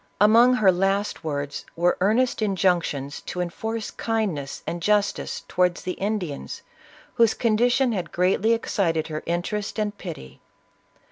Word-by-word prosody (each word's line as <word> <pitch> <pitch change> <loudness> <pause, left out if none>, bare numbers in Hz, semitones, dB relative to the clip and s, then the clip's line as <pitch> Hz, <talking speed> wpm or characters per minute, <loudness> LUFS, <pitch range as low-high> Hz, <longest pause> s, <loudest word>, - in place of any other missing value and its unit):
Among 230 +5 +6
her 205 -6 +5
last 195 +1 0
words, 145 -2 -3
were 175 +1 +2
earnest 230 +6 +2
injunctions 175 -8 0
to 180 - -4
enforce 220 +5 -3
kind 220 -4 -1
ness 140 -2 -7
and 170 +2 -4
justice 205 +2 0
towards 180 -1 +1
the 185 - -2
Indians, 190 -7 -4 0.5
whose 230 -2 +4
condition 245 +3 +2
had 180 -6 -3
greatly 190 +5 +2
excited 165 -8 0
her 155 0 -4
interest 190 +6 -2
and 210 -1 -1
pity. 165 - -9
195 Hz, 135 wpm, -24 LUFS, 170-220 Hz, 0.5 s, Among